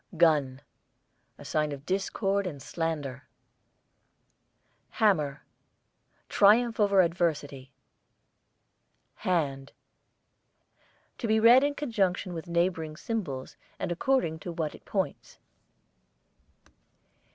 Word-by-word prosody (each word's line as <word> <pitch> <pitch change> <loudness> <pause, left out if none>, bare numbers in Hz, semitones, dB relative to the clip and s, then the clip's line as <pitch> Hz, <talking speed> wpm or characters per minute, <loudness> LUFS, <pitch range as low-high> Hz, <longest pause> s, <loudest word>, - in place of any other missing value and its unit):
GUN, 145 -5 +3 0.8
a - - -12
sign 150 -1 0
of 140 0 -8
discord 195 +1 -1
and 145 -6 -6
slander. 145 -4 -4 1.7
HAMMER, 155 - +1 0.8
triumph 225 +3 +4
over 200 -2 +5
adversity. 155 -6 -1 1.5
HAND, 140 -7 -1 1.5
to 235 - -2
be 220 0 +3
read 240 +4 +7
in 285 0 0
conjunction 195 -10 -1
with 165 +1 -7
neighbouring 170 -3 -1
symbols 155 - -4 0.2
and - - -3
according 175 -4 0
to 175 - -6
what 160 -3 -3
it - - -15
points. - - -3
170 Hz, 90 wpm, -28 LUFS, 150-200 Hz, 1.7 s, read